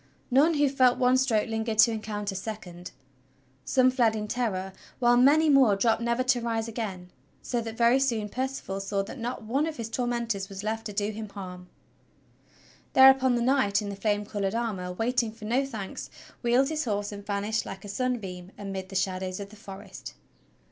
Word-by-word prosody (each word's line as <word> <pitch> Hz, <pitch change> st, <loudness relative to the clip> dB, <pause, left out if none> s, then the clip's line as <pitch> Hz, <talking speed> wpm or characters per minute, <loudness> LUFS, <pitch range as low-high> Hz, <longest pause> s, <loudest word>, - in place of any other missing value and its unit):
None 300 Hz, +6 st, +4 dB
who 290 Hz, -1 st, +3 dB
felt 255 Hz, -2 st, +3 dB
one 250 Hz, 0 st, +4 dB
stroke 250 Hz, -5 st, +2 dB
lingered 225 Hz, 0 st, -2 dB
to 230 Hz, +2 st, +7 dB
encounter 210 Hz, -2 st, -4 dB
a -, -, -9 dB
second. 185 Hz, -4 st, -7 dB, 0.7 s
Some 255 Hz, -1 st, +3 dB
fled 235 Hz, -4 st, +2 dB
in 210 Hz, -1 st, -3 dB
terror, 200 Hz, -6 st, -2 dB, 0.2 s
while 240 Hz, -1 st, +4 dB
many 285 Hz, +6 st, +5 dB
more 270 Hz, -8 st, +5 dB
dropped 225 Hz, +3 st, +2 dB
never 235 Hz, +2 st, 0 dB
to 255 Hz, -1 st, +2 dB
rise 230 Hz, -1 st, -1 dB
again; 195 Hz, -6 st, -5 dB, 0.3 s
so 240 Hz, -2 st, -1 dB
that 225 Hz, -1 st, -7 dB
very 235 Hz, +2 st, +4 dB
soon 230 Hz, -6 st, 0 dB
Percival 255 Hz, -4 st, -4 dB
saw 195 Hz, 0 st, -1 dB
that 220 Hz, +6 st, -9 dB
not 240 Hz, +1 st, -4 dB
one 270 Hz, +8 st, 0 dB
of 315 Hz, -2 st, -5 dB
his 230 Hz, -1 st, -5 dB
tormentors 235 Hz, -4 st, -2 dB
was 195 Hz, 0 st, -7 dB
left 225 Hz, +1 st, -3 dB
to 210 Hz, -, -7 dB
do 205 Hz, +1 st, -1 dB
him 215 Hz, 0 st, -7 dB
harm. 180 Hz, -2 st, -9 dB, 1.2 s
Thereupon 265 Hz, -1 st, +7 dB
the 235 Hz, -, 0 dB
knight 250 Hz, -6 st, +2 dB
in 205 Hz, -2 st, -4 dB
the 200 Hz, -, -5 dB
flame 205 Hz, +1 st, 0 dB
colored 200 Hz, -1 st, -2 dB
armor, 205 Hz, -6 st, -2 dB
waiting 230 Hz, +4 st, 0 dB
for 215 Hz, -1 st, -11 dB
no 255 Hz, +5 st, +1 dB
thanks, 215 Hz, -7 st, -6 dB, 0.3 s
wheeled 250 Hz, +3 st, +3 dB
his 310 Hz, -2 st, -2 dB
horse 205 Hz, -2 st, -2 dB
and 205 Hz, 0 st, -8 dB
vanished 205 Hz, +2 st, -2 dB
like 190 Hz, +1 st, -8 dB
a -, -, -7 dB
sunbeam 200 Hz, -5 st, -3 dB
amid 195 Hz, -2 st, -6 dB
the 195 Hz, -, -9 dB
shadows 185 Hz, 0 st, -1 dB
of 200 Hz, 0 st, -7 dB
the -, -, -13 dB
forest. 200 Hz, -2 st, -10 dB
220 Hz, 190 wpm, -27 LUFS, 200-250 Hz, 1.2 s, to